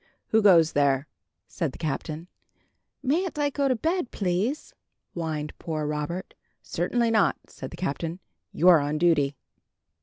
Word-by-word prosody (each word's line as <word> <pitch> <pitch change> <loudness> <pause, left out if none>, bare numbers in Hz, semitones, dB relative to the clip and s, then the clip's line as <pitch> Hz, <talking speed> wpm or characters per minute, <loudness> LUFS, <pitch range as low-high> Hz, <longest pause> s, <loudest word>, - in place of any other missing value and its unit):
"Who 220 - +4
goes 170 -6 +6
there?" 140 -1 +2 0.4
said 160 -7 -3
the - - -10
Captain. 155 +1 -4 0.8
"Mayn't 320 +6 0
I 290 -1 +1
go 280 0 +1
to 260 - +2
bed, 325 - -1
please?" 200 - -1 0.4
whined 155 -3 -3
poor 155 -2 -3
Robert. 150 +5 -3 0.3
"Certainly 230 +7 0
not," 215 -3 +3
said - - -8
the - - -10
Captain. 165 +1 -3 0.3
"You're 175 0 +6
on 145 +1 -1
duty." 150 -4 +3
170 Hz, 140 wpm, -26 LUFS, 150-225 Hz, 0.8 s, goes